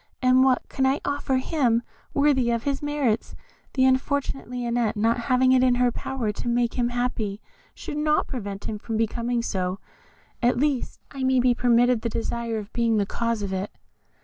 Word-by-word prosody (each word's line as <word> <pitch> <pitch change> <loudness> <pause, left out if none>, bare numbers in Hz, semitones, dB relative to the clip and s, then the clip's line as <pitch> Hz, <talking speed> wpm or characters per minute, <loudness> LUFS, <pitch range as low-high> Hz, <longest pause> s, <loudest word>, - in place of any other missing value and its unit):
and 255 0 +4
what 260 -1 +2
can 265 - -2
I 265 +2 +2
offer 285 -2 0
him 255 -4 +1 0.3
worthy 280 -4 +2
of 235 -1 0
his 280 -1 -1
merits? 290 -7 -1 0.4
The 260 -1 +3
unfortunate 270 +1 0
Lionette 240 -2 -1
not 230 +3 +2
having 255 +1 +3
it 260 -1 +5
in 250 -1 +4
her 245 0 +2
power 240 -3 -3
to 210 - -6
make 240 0 +1
him 240 -1 0
happy, 240 -4 -2 0.4
should 295 - -6
not 300 0 +2
prevent 205 -6 -6
him 210 -1 -4
from 225 +1 -3
becoming 235 +1 -1
so, 185 -3 -2 0.6
at 245 0 +2
least 280 -1 -1
I 275 - -7
may 260 0 +3
be 250 0 +4
permitted 240 -1 +3
the 235 - -2
desire 230 0 -3
of 210 0 -7
being 230 -2 +2
the 205 - +2
cause 230 0 -2
of 195 -1 -3
it." 190 +2 -2
245 Hz, 185 wpm, -25 LUFS, 230-260 Hz, 0.6 s, it